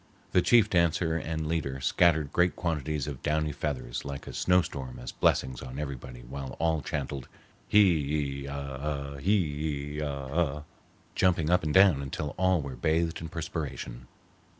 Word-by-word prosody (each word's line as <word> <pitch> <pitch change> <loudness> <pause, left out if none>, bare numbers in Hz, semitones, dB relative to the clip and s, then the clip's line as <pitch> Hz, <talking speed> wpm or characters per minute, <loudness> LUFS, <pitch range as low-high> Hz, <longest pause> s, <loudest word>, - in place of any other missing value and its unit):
The 90 - +5
chief 115 +2 +5
dancer 85 -3 +2
and 80 -1 -2
leader 75 -5 -2
scattered 80 +1 +3
great 90 0 +3
quantities 75 -4 -1
of 70 -4 -6
downy 75 0 0
feathers 70 -5 -3
like 70 -1 -6
a - - -8
snowstorm 70 -8 +1
as - - -6
blessings 65 -1 +1
on 65 0 -7
everybody, 65 -4 -6
while 65 +1 -7
all 80 -2 +1
chanted, 70 -4 -4 0.4
"Hee 75 -8 +3
ee 70 - -6
ah 70 -1 -5
ah, 70 -1 -3
hee 75 -4 0
ee 75 - -3
ah 70 -3 -4
ah," 75 -3 0 0.5
jumping 85 -3 +2
up 90 0 +4
and 75 -1 -2
down 95 -7 +6
until 70 +2 -4
all 95 -4 +3
were 70 -2 -6
bathed 80 +5 0
in 80 - -6
perspiration. 75 -7 -5
75 Hz, 160 wpm, -29 LUFS, 70-85 Hz, 0.5 s, down